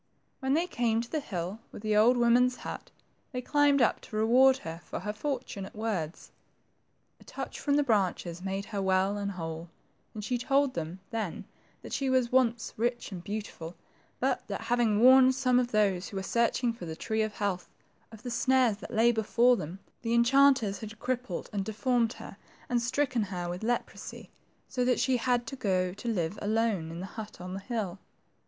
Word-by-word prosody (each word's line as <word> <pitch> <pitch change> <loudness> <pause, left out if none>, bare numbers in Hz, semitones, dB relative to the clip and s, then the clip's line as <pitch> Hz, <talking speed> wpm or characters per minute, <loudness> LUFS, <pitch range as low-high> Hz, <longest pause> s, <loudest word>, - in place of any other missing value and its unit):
When 265 +1 +1
they 335 +3 +2
came 235 -9 0
to 235 - -9
the 315 - 0
hill 185 - -4
with - - -10
the 215 -1 +1
old 235 +4 +5
woman's 245 +1 +4
hut, - - -6 0.4
they 250 - -3
climbed 290 -2 +4
up - - +1
to - - -10
reward 255 +5 +5
her 165 +1 -6
for - - -6
her 210 +2 -3
fortunate 240 -5 -4
words. 200 -7 -3 0.9
A - - -16
touch - - -6
from 285 -1 +1
the 290 - +4
branches 185 -7 0
made 195 +1 -3
her 200 - -1
well 190 +1 +2
and 200 -1 -3
whole; 165 -1 -6 0.5
and 210 - -5
she 245 +3 -1
told 275 +1 +2
them 170 +3 -5
then 220 -6 -3 0.4
that - - -8
she 270 -1 0
was 255 -2 +2
once 240 -3 +2
rich 240 +1 -1
and 180 -3 -7
beautiful, 200 -5 -6 0.4
but - - 0
that - - -4
having 230 -3 +2
warned 260 +1 +7
some 255 -2 +3
of 245 -1 -1
those 200 -4 +1
who 200 - -6
were 190 - -2
searching 235 +3 +1
for 180 -7 -8
the 160 - -5
tree 220 +6 -1
of 215 -1 -1
health, 200 -4 -2 0.4
of 220 0 -13
the 245 - -4
snares 240 -2 +3
that 215 - -9
lay 230 +2 +5
before 235 +2 +3
them, 170 -3 -6 0.2
the 235 0 0
enchanters 235 -4 +4
had 220 0 -8
crippled 245 -6 -3
and 200 -2 -1
deformed 230 +2 0
her, - - -10 0.3
and 245 -1 +1
stricken 255 0 0
her 180 -4 -3
with 175 +1 -4
leprosy, 240 +2 -4 0.4
so 250 - -1
that 250 0 +2
she 260 -1 +2
had 245 0 +1
to 230 - -6
go 185 -6 0
to 220 +5 -8
live 190 -3 -1
alone 215 -6 0
in 165 +2 -6
the - - -4
hut 215 +2 -8
on 180 +1 -6
the 195 - -4
hill. 200 -4 -4
225 Hz, 195 wpm, -29 LUFS, 195-250 Hz, 0.9 s, warned